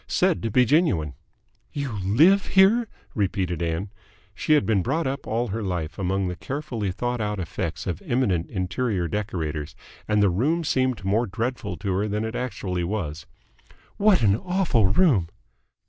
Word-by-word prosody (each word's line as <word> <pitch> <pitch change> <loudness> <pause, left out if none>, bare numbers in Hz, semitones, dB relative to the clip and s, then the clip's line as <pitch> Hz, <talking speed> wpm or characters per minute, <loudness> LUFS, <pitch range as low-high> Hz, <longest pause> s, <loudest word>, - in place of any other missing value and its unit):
Said 185 -2 +1
to 115 - -1
be 125 +4 +4
genuine." 115 - +2 0.6
"You 140 -3 -3
live 160 - +4
here?" 210 +5 +5 0.3
repeated 95 -4 -1
Ann. 85 +4 -2 0.4
She 155 - +1
had 150 - +4
been 105 -4 +2
brought 140 - -1
up 135 +1 -3
all 115 +2 -1
her 110 +3 -3
life 90 -5 -3
among 95 0 0
the 90 - -3
carefully 130 - -4
thought 120 +4 -2
out 105 -1 -2
effects 85 -4 -4
of - - -3
eminent 100 -10 0
interior 95 0 -1
decorators, 80 -7 -3 0.3
and 105 -1 +2
the 100 - +4
room 150 - +1
seemed 130 -8 0
more 110 +5 +1
dreadful 110 -2 -3
to 100 -3 -2
her 100 +3 0
than 105 +1 -2
it 110 - -4
actually 95 -8 -3
was. 85 -5 -4 0.7
"What 200 - +4
an 100 -2 +5
awful 180 - +1
room!" 100 - +3
105 Hz, 160 wpm, -24 LUFS, 95-130 Hz, 0.7 s, here